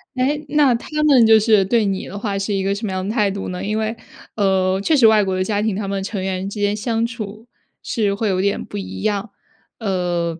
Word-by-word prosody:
哎， 285 +4 0
那 290 -4 +4
他 230 - -4 0.2
们 265 -7 +6
就 220 0 +7
是 215 -2 +4
对 215 +2 +2
你 195 -1 -2
的 200 - -7
话 200 -1 -2
是 195 +2 -2
一 195 -1 0
个 195 +1 +1
什 215 +2 -4
么 195 - -3
样 185 0 -3
的 210 - -2
态 210 -4 +2
度 195 -1 -5
呢？ 180 - -5
因 215 +2 -1
为， 220 +1 -1 0.4
呃， 190 -2 +1
确 310 +10 +2
实 250 - +5
外 220 -2 +6
国 190 -1 -1
的 185 - 0
家 205 +1 -1
庭， 215 -2 0
他 200 0 -3
们 195 0 -2
成 195 -1 -4
员 190 +1 -3
之 210 - -7
间 205 0 +1
相 225 +1 -1
处 220 -1 -7 0.4
是 210 -5 0
会 215 +2 -1
有 185 -2 +1
点 200 +1 0
不 - - -7
一 95 0 -7
样。 205 +2 -1 0.5
呃， 175 -5 -1
205 Hz, 265 characters per minute, -20 LUFS, 190-225 Hz, 0.5 s, 就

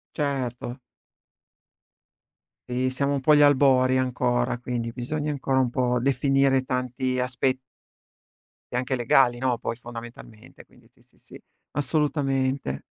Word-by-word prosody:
Certo. 130 -3 -3 1.9
Eh, 125 +1 0
siamo 140 +2 -1
un 140 - -1
po' 150 +3 +4
agli 145 - +6
albori 130 -2 +4
ancora, 125 -1 0
quindi 120 -1 -4
bisogna 145 +5 -3
ancora 135 -1 0
un 125 -2 +2
po' 125 -1 +1
definire 135 0 +2
tanti 130 0 -2
aspe 130 +1 0 1.2
e - - -1
anche 125 +1 -1
legali, 120 0 +3
no, 125 -2 0
poi 115 - -3
fondamentalmente, 120 -2 -11
quindi - - -24
sì, - - -28
sì, - - -28
sì, - - -14 0.3
assolutamente. 135 - -1
130 Hz, 125 wpm, -25 LUFS, 125-135 Hz, 1.9 s, agli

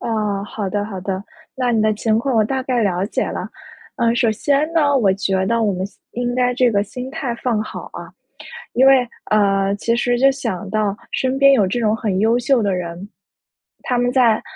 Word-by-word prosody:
哦， 210 -3 -2
好 205 -1 -4
的 205 +1 -2
好 195 -3 -6
的。 190 0 -3 0.3
那 250 -2 0
你 225 - +2
的 215 0 +2
情 220 +1 +1
况 260 +1 -1
我 220 - +4
大 265 +4 -2
概 250 -3 0
了 185 -2 0
解 - - -1
了。 - - -4 0.5
呃， 235 0 +2
首 240 -2 +2
先 285 +7 0
呢， 290 -3 +3
我 210 -7 +3
觉 190 -1 0
得 230 0 +1
我 210 - +1
们 185 +1 -3
先 200 - -22
应 245 0 -2
该 250 0 +2
这 250 -1 +2
个 200 -1 +1
心 250 +5 -7
态 250 -3 -3
放 235 -3 -1
好 - - -8
啊。 - - -9 0.6
因 260 +2 +4
为 265 -2 +5 0.2
呃， 195 -2 +2
其 230 +3 0
实 245 0 +1
就 270 +2 +5
想 225 -8 -4
到 210 -1 0 0.2
身 260 +1 -1
边 275 0 +6
有 215 -7 +4
这 195 +6 -2
种 215 -2 +2
很 205 -5 -2
优 225 +3 +3
秀 245 0 +2
的 200 -2 0
人， 180 +2 -6 0.7
他 250 - -1
们 245 0 +1
在 240 -4 +3
225 Hz, 230 characters per minute, -19 LUFS, 200-250 Hz, 0.7 s, 边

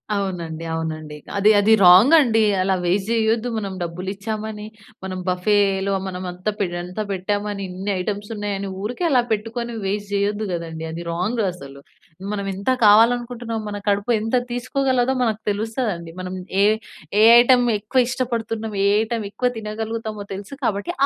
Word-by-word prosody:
అవునండి. 170 -5 -3
అవునండి. 155 -2 -4 0.2
అది, 205 +2 +4
అది 215 +2 +4
రాంగండి. 225 - +7 0.2
అలా 190 0 +2
వేస్ట్ 190 +4 0
జేయొద్దు. 225 +1 +1
మనం 200 -3 -3
డబ్బులిచ్చామని, 205 +5 -5 0.4
మనం 185 -1 -4
బఫెలో 195 +1 +1
మనం 185 0 -5
అంత 180 +3 -10
పె 200 - +2 0.2
ఎంత 180 +4 -8
పెట్టామని, 205 +1 -2
ఇన్ని 190 +3 -4
ఐటెమ్స్ 205 +2 -4
ఉన్నాయని 200 -1 -3
ఊరికే 245 - -3
అలా 255 -3 +4
పెట్టుకొని 230 +2 -2
వేస్ట్ 205 +1 -2
జేయొద్దు 205 +1 0
గదండీ! 165 -1 -5
అది 165 +1 -6
రాంగ్ 205 +8 -1
అసలు. 140 -5 -11 0.5
మనం 200 -1 -3
ఎంత 200 +7 -1
కావాలనుకుంటున్నాం, 230 +1 +3
మన 205 0 -4
కడుపు 205 +4 +1
ఎంత 225 +3 -1 0.2
తీసుకోగలదో 255 +1 0
మనకు 220 -3 0
తెలుస్తదండి. 210 -5 -2
మనం 185 0 -5 0.3
ఏ - - +6 0.6
ఏ - - +7 0.2
ఐటెమ్ 245 +1 +5
ఎక్కువ 215 +5 +1
ఇష్టపడుతున్నాం, 225 -4 -3
ఏ - - +4
ఐటెమ్ 225 0 -2
ఎక్కువ 250 +4 0
తినగలుగుతామో 220 0 -4
తెలుసు 200 +6 -8
కాబట్టి 200 -4 -1
205 Hz, 140 wpm, -22 LUFS, 190-225 Hz, 0.6 s, రాంగండి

